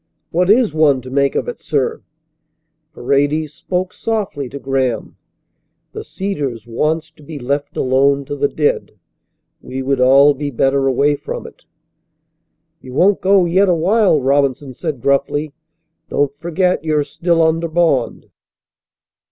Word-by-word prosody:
"What 180 +2 +1
is 220 -5 +4
one 150 -4 +3
to 130 - -9
make 140 0 +1
of - - -1
it, 485 - -5
sir?" 460 -1 -2 0.9
Paredes 145 +3 0
spoke 180 +3 -3
softly 200 - -3
to 140 - -7
Graham. 135 -4 -2 0.8
"The - - -7
Cedars 145 - -4
wants 155 +7 -2
to 155 - -21
be 150 +1 -9
left 140 +2 -3
alone 140 +2 +2
to 145 +1 -5
the 145 0 +1
dead. 150 0 -1 0.7
We 130 +1 -6
would 135 -1 0
all 135 +3 +6
be 145 +1 -4
better 135 +1 +1
away 140 +3 +2
from - - -6
it." - - -14 1.2
"You 130 - -11
won't 190 +8 +3
go 190 -1 +4
yet 185 +3 +3
awhile," 180 +1 +3
Robinson 135 0 0
said 150 -2 -5
gruffly. 140 +2 0 0.6
"Don't 145 -1 0
forget 175 0 0
you're 155 -2 +1
still 170 +2 0
under 165 +1 +1
bond." 160 -7 0
145 Hz, 140 wpm, -17 LUFS, 135-170 Hz, 1.2 s, all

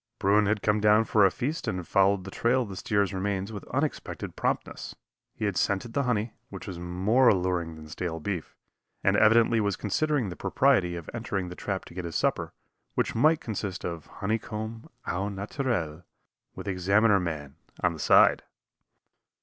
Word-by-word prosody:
Bruin 105 +1 +3
had 105 0 0
come 105 0 +2
down 105 +1 +5
for 105 -3 +5
a - - +2
feast 145 - -3
and 90 - -1
had 90 - -6
followed 100 -1 +3
the 95 - -8
trail 125 +5 +2
of 110 - -9
the 95 - -6
steer's 100 0 0
remains 95 +1 -2
with 100 - -6
unexpected - - -3
promptness. - - -3 0.4
He 110 - -3
had 100 -2 -1
scented 100 +5 0
the 140 - +1
honey, 110 -1 0 0.2
which - - -8
was 90 -3 -6
more 95 +9 +2
alluring 90 -3 0
than 80 0 -11
stale 80 +1 -4
beef, 90 0 -4 0.5
and - - +3
evidently 115 +1 +5
was 100 -2 +1
considering 135 +2 0
the 90 - -6
propriety 95 - +2
of 85 -2 -7
entering 100 -6 -3
the 90 - -8
trap 95 0 -4
to - - -13
get 90 0 -5
his 85 - -6
supper, - - 0 0.4
which - - 0
might 155 +7 +3
consist 100 -4 -4
of 85 -3 -5
honeycomb 110 +2 -4 0.2
au 95 +3 -2
naturel, 100 - -2 0.5
with - - -8
Examiner 100 +3 +3
man 75 -5 -5 0.3
on - - +3
the - - -9
side. - - +5
100 Hz, 180 wpm, -27 LUFS, 90-110 Hz, 0.5 s, down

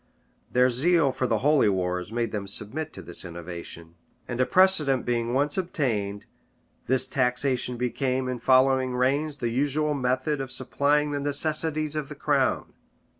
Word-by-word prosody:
Their 125 +1 +4
zeal 150 +3 +3
for 130 0 -2
the 110 - +1
holy 150 -7 +4
wars 90 0 -2
made 115 -1 -1
them 100 -2 -4
submit 135 +11 -4
to 95 - -9
this 85 +1 -5
innovation; 85 -1 -8 0.3
and 120 +1 -2
a 130 - +2
precedent 160 -9 +3
being 120 0 -1
once 145 +4 +1
obtained, 110 - -2 0.6
this 130 0 +3
taxation 125 -1 0
became, 130 +1 -1
in 125 -1 -3
following 130 +1 +3
reigns, 140 +4 0
the 120 -3 -2
usual 145 +5 0
method 130 +2 -1
of 135 -1 -6
supplying 145 +3 0
the 145 - -2
necessities 155 +1 0
of 150 -3 -3
the 150 - -8
crown. 140 -2 0
130 Hz, 155 wpm, -26 LUFS, 120-145 Hz, 0.6 s, Their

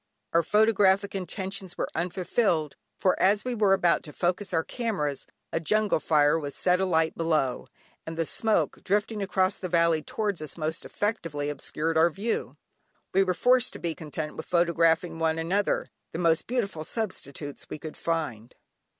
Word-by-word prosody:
Our 170 - +5
photographic 200 0 +3
intentions 190 -1 -5
were - - -1
unfulfilled, 175 -2 0 0.2
for 185 - +2
as 205 +4 +3
we 250 - -1
were 210 -4 +3
about 175 -3 +3
to 150 - -9
focus 185 +2 -1
our 165 -2 +1
cameras, 185 - -3 0.3
a - - +1
jungle 210 +4 +2
fire 150 0 +3
was 145 -2 -4
set 180 0 +2
alight 165 -4 +1
below, 155 -6 0 0.4
and 160 0 -7
the 165 - +1
smoke, 220 +6 0
drifting 205 +2 0
across 190 0 +1
the 185 - -5
valley 170 -2 +3
towards 205 0 -2
us 155 - -5
most 155 0 -3
effectually 165 -9 -2
obscured 160 +3 -1
our 165 +2 +6
view. 205 +7 -3 0.6
We 190 - +5
were 185 -2 +1
forced 250 +3 +4
to - - -8
be 170 -1 -2
content 155 -1 -5
with - - -7
photographing 170 -1 +2
one 160 0 +1
another, 185 +5 0 0.2
the - - -3
most 165 -2 +2
beautiful 210 -10 -2
substitutes 150 - -5
we - - -5
could 155 0 -8
find. 130 -9 -3
170 Hz, 165 wpm, -27 LUFS, 160-200 Hz, 0.6 s, our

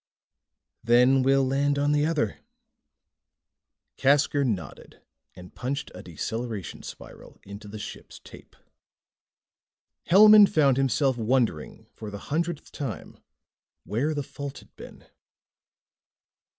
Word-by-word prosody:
"Then 125 +3 +4
we'll 135 +1 +3
land 140 +2 0
on 145 +1 +1
the 150 +1 +2
other." 150 -11 -2 1.6
Casker 140 +1 +2
nodded 95 - -5 0.4
and 90 0 -13
punched 140 +3 -5
a - - -10
deceleration 110 +3 -6
spiral - - -12
into 100 +1 -11
the 105 +1 -8
ship's - - -9
tape. - - -16 1.5
Hellman 210 +2 +8
found 140 -7 +2
himself 135 -1 +1
wondering 115 -8 -1
for 110 - -9
the 100 +7 -8
hundredth 170 -1 -3
time 130 -9 -7 0.6
where 140 +9 -2
the 145 - -2
fault 140 +1 -8
had - - -17
been. - - -13
135 Hz, 110 wpm, -25 LUFS, 110-145 Hz, 1.6 s, Hellman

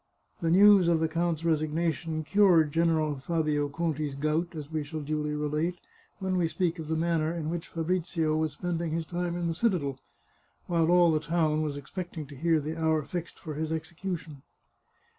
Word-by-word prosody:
The 165 - +1
news 195 +1 +7
of 170 -1 +3
the 160 - +2
count's 165 0 -1
resignation 160 0 0
cured 175 -4 +4
General 160 -2 +1
Fabio 150 -1 0
Conti's 155 -2 -2
gout, 155 +4 -1
as 150 -1 -7
we 155 -1 -1
shall 155 +2 -5
duly 150 0 -2
relate, 150 +4 -1 0.4
when 190 -2 -1
we 175 -2 +2
speak 170 0 -1
of 160 - -6
the 160 - 0
manner 160 -1 +1
in 165 -2 -3
which 170 -1 -4
Fabrizio 165 -2 -1
was 155 -1 0
spending 170 +1 -2
his 165 0 -1
time 175 +1 -2
in 175 - -2
the 165 - 0
citadel, 165 - 0 0.7
while 170 -2 +1
all 175 -1 +6
the 155 - +2
town 155 -1 +1
was 150 -2 -2
expecting 165 +2 -6
to 140 +1 -12
hear 165 +3 +2
the 155 +2 -4
hour 160 -1 +2
fixed 175 +2 -6
for 155 - -7
his 155 +1 -3
execution. 160 -2 -5
160 Hz, 180 wpm, -28 LUFS, 155-170 Hz, 0.7 s, news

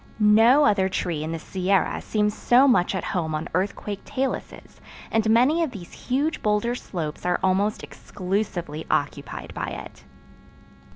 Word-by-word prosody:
No 225 +7 +6
other 195 -7 +3
tree 170 -4 -2
in 160 - -4
the 165 - -3
Sierra 190 +3 0
seems 210 -1 0
so 255 +3 +4
much 205 -7 +3
at 185 - -2
home 160 -4 -2
on 155 +2 -3
earthquake 200 +2 -2
taluses 265 0 -5 0.3
and 220 -1 +1
many 255 +9 +4
of 325 - +1
these 195 -8 -10
huge 285 +5 -2
boulder 210 +3 +1
slopes 165 -10 -5
are 180 0 +1
almost 195 +3 +1
exclusively 180 -5 -4
occupied 145 0 -2
by - - -4
it. - - -8
200 Hz, 150 wpm, -24 LUFS, 180-235 Hz, 0.3 s, No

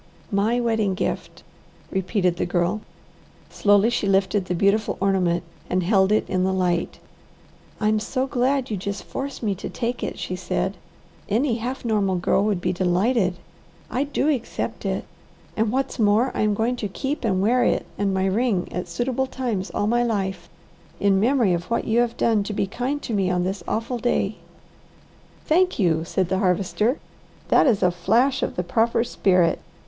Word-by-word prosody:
"My 215 +4 +2
wedding 220 -5 +1
gift!" - - -4 0.5
repeated 185 -2 0
the - - 0
Girl. 175 +4 0 0.7
Slowly 205 +2 +3
she 215 - 0
lifted 195 0 +2
the 180 - -2
beautiful 200 +4 +1
ornament 185 -3 +1 0.3
and 185 0 +1
held 190 +1 +3
it 215 - +2
in 185 -1 0
the 190 - +1
light. 180 -2 0 0.8
"I'm 215 0 +2
so 255 +4 -1
glad 265 0 0
you 210 - -1
just 200 +2 -4
force 275 -1 -6
me 205 -2 +1
to 190 - -6
take 245 0 -3
it," - - -4
she 180 - -4
said. 190 +1 -2 0.5
"Any 235 +3 +1
half 250 +3 -5
normal 205 -4 +1
girl 180 +2 +2
would 205 -4 +1
be - - 0
delighted. 185 +2 +1 0.6
I 265 +3 0
do 285 0 -1
accept 265 -6 -2
it. - - -2 0.5
And 220 -1 +1
what's 265 +1 -2
more, 220 +4 +3
I - - -1
am 210 -1 +2
going 235 +4 0
to 215 - -2
keep 270 +10 -4
and 190 -5 +1
wear 240 +6 +3
it - - +1
and 200 -1 0
my 190 0 0
ring 200 -1 0
at 180 - -4
suitable 260 +2 -1
times 235 -8 -3
all 205 - -1
my 240 +3 +2
life, 190 -7 -2 0.5
in 195 -1 +3
memory 235 -3 +3
of 175 0 -2
what 235 - 0
you 225 +2 +2
have 240 -1 0
done 225 -3 +2
to 210 - -4
be 200 - 0
kind 250 +8 -3
to 235 - -4
me 195 -3 +1
on 180 -1 +1
this 190 +2 -3
awful 235 +2 -2
day." 220 -3 0 1.1
"Thank 365 +4 +3
you!" 165 -5 +2
said 185 +1 0
the 190 - +1
Harvester. 200 - +1 0.5
"That - - +5
is 225 -6 +2
a 180 - +4
flash 235 +10 +2
of - - -2
the 180 - -1
proper 230 +4 +1
spirit. 185 -7 +2
205 Hz, 180 wpm, -23 LUFS, 190-240 Hz, 1.1 s, That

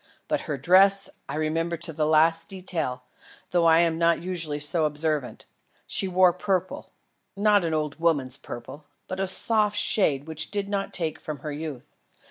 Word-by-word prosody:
But - - -1
her 145 - -1
dress 195 +7 +4 0.2
I - - -3
remember 165 +2 -1
to 165 0 -6
the 150 0 0
last 160 +1 +3
detail, 165 -9 -4 0.5
though 175 -2 +3
I 165 +1 +6
am 165 -1 0
not 170 0 +3
usually 165 -4 -3
so 155 +2 +2
observant. 150 -3 -2 0.4
She 195 - 0
wore 185 -1 +4
purple; 185 0 -2 0.5
not 205 -1 +3
an 165 -1 -1
old 150 -1 -3
woman's 145 -6 +1
purple, 140 +2 -10 0.2
but 185 - -5
a 195 - 0
soft 210 +2 +2
shade 150 -9 +1
which 155 -1 -2
did 205 -1 -2
not 200 -1 -2
take 160 -4 -2
from 150 -4 -7
her 150 - -5
youth. 145 -3 -7
165 Hz, 170 wpm, -25 LUFS, 150-185 Hz, 0.5 s, I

